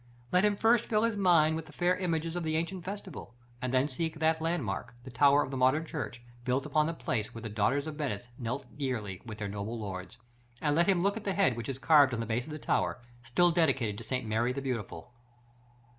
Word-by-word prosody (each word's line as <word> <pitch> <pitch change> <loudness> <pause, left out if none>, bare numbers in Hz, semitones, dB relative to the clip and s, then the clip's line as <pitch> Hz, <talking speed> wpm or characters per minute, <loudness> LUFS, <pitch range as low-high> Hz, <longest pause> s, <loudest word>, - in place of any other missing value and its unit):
Let 180 +2 +4
him 210 -1 +3
first 230 +2 +3
fill 215 -1 +2
his 230 -2 +1
mind 170 -5 +4
with 160 0 -5
the - - -12
fair 180 +1 +1
images 165 -3 -2
of 175 - -1
the 155 -1 -1
ancient 170 +3 -2
festival, 190 - -7 0.3
and 130 -2 -2
then 130 +2 +3
seek 160 0 -3
that 160 0 +2
landmark 150 - -2
the 130 - -9
tower 140 +3 +5
of - - -6
the 135 - -3
modern 130 +5 +3
church, 120 -4 -5 0.2
built 130 +2 0
upon 155 0 +2
the 165 - -2
place 115 -6 -3
where 115 - -7
the 115 - -4
daughters 115 +7 +1
of 155 -2 -6
Venice 125 -6 -3
knelt 120 0 -3
yearly 115 -10 -3
with 110 -1 -7
her 105 - -2
noblest 105 +3 -4
lords; 95 +1 -6 0.4
and 150 -1 +1
let 170 +2 +4
him 190 -3 +3
look 200 +3 +1
at 220 - -6
the 195 -2 -1
head 195 - +3
that 120 +3 -5
is 135 - -3
carved 140 -3 +5
on - - -4
the 115 - -2
base 120 +2 -2
of - - -8
the 155 - -4
tower, 145 - 0 0.2
still 175 +9 +3
dedicated 135 - +1
to - - -8
St. 125 +2 -2
Mary 110 +3 +1
the 130 - -3
Beautiful. 125 -2 -5
140 Hz, 235 wpm, -30 LUFS, 120-165 Hz, 0.4 s, tower